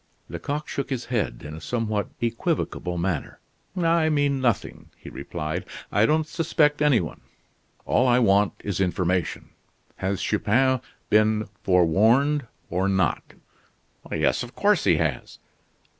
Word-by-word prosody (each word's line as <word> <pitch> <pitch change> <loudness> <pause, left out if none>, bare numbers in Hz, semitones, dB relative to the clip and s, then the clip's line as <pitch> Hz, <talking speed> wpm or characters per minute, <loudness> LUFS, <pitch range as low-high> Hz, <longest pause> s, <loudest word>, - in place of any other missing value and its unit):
Lecoq 150 +1 -4
shook 140 - -4
his 130 -3 -3
head, 110 -7 -1
in 75 - -7
a 80 - -8
somewhat 110 -1 -2
equivocal 115 - -2
manner. 85 -3 -2 0.4
"I 165 -2 +3
mean 145 -3 +1
nothing," 120 -5 -1
he - - -11
replied, 75 +4 -4 0.3
"I 105 +2 +3
don't 155 +1 +2
suspect 155 -2 +1
any 145 -6 +4
one. 80 - -6 0.6
All 130 - +2
I 120 0 +4
want 100 -4 +3
is 95 -2 -2
information. 90 -2 -1 0.5
Has 95 0 -2
Chupin 125 +5 +2 0.3
been 110 0 +3 0.2
forewarned 110 - +3 0.2
or 95 +3 +1
not?" 95 -4 +1 0.9
"Yes, - - +1
of - - -8
course - - +2
he - - +4
has." - - -2
110 Hz, 130 wpm, -25 LUFS, 95-140 Hz, 0.9 s, any